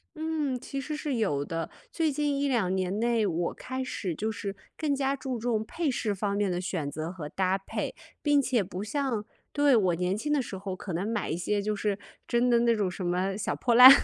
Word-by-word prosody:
嗯， 310 -5 -1
其 275 - -5
实 300 +3 -4
是 300 -3 -2
有 145 -11 +1
的， 165 -1 -3 0.2
最 320 -2 +1
近 290 0 0
1、2 240 -10 +1
年 190 +2 -1
内， 235 -1 +2
我 170 -1 -1
开 260 0 -4
始 190 -9 -3
就 220 +7 -1
是 200 -2 -4 0.2
更 300 -3 +1
加 275 0 +1
注 260 -2 -3
重 225 -1 0
配 315 +5 -1
饰 220 -4 0
方 200 +1 -1
面 205 -1 +1
的 175 - -1
选 180 -6 -2
择 155 +3 -4
和 165 -5 -6
搭 190 +2 +1
配， 195 - -4 0.3
并 290 -1 +5
且 250 -5 +2
不 185 +1 -5
像 235 -2 -1 0.3
对， 290 -2 +4
我 185 -6 +3
年 180 +3 0
轻 295 +7 -2
的 290 - +3
时 210 -5 -6
候 190 -1 -4
可 185 0 -6
能 180 +5 -1
买 225 -1 -1
一 160 - -1
些 205 +4 0
就 210 +1 -1
是 205 -1 -1 0.3
真 240 +1 +3
的 235 -1 +5
那 235 0 +4
种 205 -4 +1
什 180 +1 -5
么 185 +2 0
小 210 - -1
破 240 -2 +2
烂。 250 +2 +13
215 Hz, 240 characters per minute, -29 LUFS, 185-260 Hz, 0.3 s, 烂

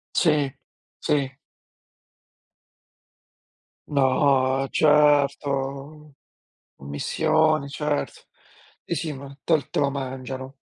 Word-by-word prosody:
Sì, 150 -5 +3 0.5
sì. 135 -3 -1 2.5
No, 135 -1 +2
certo. 145 -1 +1 0.6
Commissioni, 155 - 0
certo. 150 0 -2 0.6
Sì, 170 - -3
sì 155 0 -3
ma 140 0 -10
te 165 - +3
l 145 - -8
te - - -2
lo 140 -1 +2
mangiano. 130 -1 -6
140 Hz, 80 wpm, -24 LUFS, 135-150 Hz, 2.5 s, Sì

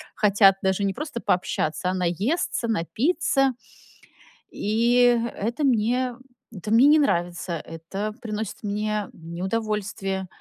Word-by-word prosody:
хотят 200 -2 +5
даже 190 +1 0
не 195 -1 0
просто 300 -5 -5
пообщаться, 180 -1 0
а 185 - 0
наесться, 195 - -1
напиться. 270 - +1 1.0
И 240 +3 +3 0.2
это 235 +8 -2
мне 245 0 +1 0.4
это 210 0 -6
мне 240 +5 +6
не 305 +1 +6
нравится, 175 -8 0
это 185 +7 -6
приносит 215 -2 -5
мне 210 0 -2
неудовольствие. 190 +2 -3
210 Hz, 110 wpm, -24 LUFS, 190-240 Hz, 1.0 s, мне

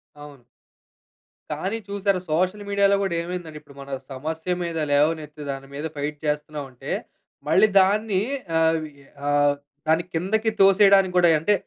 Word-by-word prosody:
అవును. 145 -4 -13 1.1
కానీ 190 +9 -2
చూశారా? 200 -1 0
సోషల్ 185 +5 0
మీడియాలో 200 0 +3
గూడా 190 -3 -1
ఏమైందంటే, 170 -3 -6
ఇప్పుడు 140 -2 -18
మన 140 - -10 0.2
సమస్య 160 +6 -3
మీద 170 -1 -4
లేవనెత్తి 150 0 0
దాని 135 0 -7
మీద 145 +3 -5
ఫైట్ 145 +1 -3
చేస్తున్నామంటే 150 -3 -4 0.6
మళ్ళీ 210 +3 +5
దాన్ని 200 0 +1 0.4
ఆవి 160 -1 +1 0.4
ఆహ్, 145 0 +3 0.3
దాన్ని 160 +2 +3
కిందకి 215 +7 0
తోసేయడానికి 195 -1 +5
గూడాయి 170 -2 +5
అంటే 185 +7 +2
165 Hz, 130 wpm, -24 LUFS, 150-195 Hz, 1.1 s, మళ్ళీ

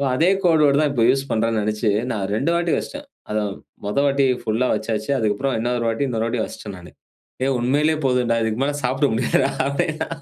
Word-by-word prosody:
அதே 165 +7 +3
கோடு 165 -3 +4
வேர்டு 140 +1 +3
தான் 150 -2 +1
இப்போ 115 -3 +2
யூஸ் 135 +1 +1
பண்றான்னு 115 0 +1
நெனைச்சு 105 +1 0 0.2
நான் 105 -4 -2
2 140 +9 0
வாட்டி 170 -1 0
வைச்சுட்டேன். 290 +1 -5 0.2
அத 105 - -1 0.5
மொத 105 - -3
வாட்டி 140 -1 +2 0.2
புல்லா 115 +4 0
வெச்சாச்சு. 110 +1 -3
அதுக்கப்புறம் 115 +4 0
இன்னொரு 120 0 -1
வாட்டி 115 +5 -1
இன்னொரு 115 -2 -1
வாட்டி 115 -1 -1
வெச்சுட்டேன் 105 -2 -7
நானு. 90 0 -13 0.5
"ஏய் 135 0 +1
உண்மயிலயே 145 +6 +2
போதும்டா. 125 -2 +1
இதுக்கு 110 +2 -2
மேல 145 +1 0
சாப்ட 135 +3 +1
முடியாதுடா" 125 +3 +1 0.2
அப்டின்னா. 150 +3 -1
125 Hz, 190 wpm, -21 LUFS, 110-140 Hz, 0.5 s, கோடு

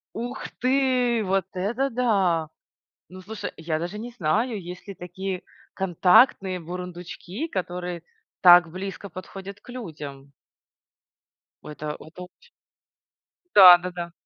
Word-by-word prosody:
Ух 240 +2 -5
ты, 255 -3 +2
вот 190 -1 0
это 230 +9 -1
да! 195 - +1 0.6
Ну 185 +1 -11
слушай, 210 +2 -6
я 160 -1 -2
даже 175 +5 -5
не 235 +3 -7
знаю, 220 +3 -1
есть 180 +3 -10
ли 200 - -6
такие 180 +1 -6 0.3
контактные 190 +1 +3
бурундучки, 180 - -7
которые 180 - -4 0.4
так 175 -2 +8
близко 195 +3 -7
подходят 195 +2 -9
к - - -19
людям. 145 - -9 1.3
Ой, 150 - -9
это 150 0 -5
это 175 +3 -11
оч 475 - -17 1.1
Да, 185 -3 +11
да, 180 +1 -5
да. 175 -1 -6
185 Hz, 120 wpm, -25 LUFS, 175-215 Hz, 1.3 s, Да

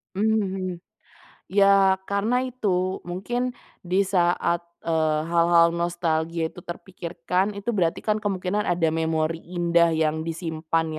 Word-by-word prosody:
Mhm. 195 -4 -1 0.7
Iya, 195 -1 +5
karena 215 +5 +1
itu, 190 -7 -1
mungkin 240 +8 -2 0.3
di 185 +3 +2
saat, 175 -2 +1 0.2
eee, 160 -2 +1
hal-hal 170 0 +5
nostalgia 170 -1 -1
itu 180 - -14
terpikirkan, 180 +2 -3
itu 200 +3 -5
berarti 170 -2 +1
kan 215 -1 +1
kemungkinan 205 0 -1
ada 170 -2 +1
memori 160 0 0 0.2
indah 170 -1 +3
yang 160 0 0
disimpan 165 -1 -2
175 Hz, 115 wpm, -24 LUFS, 165-195 Hz, 0.7 s, Iya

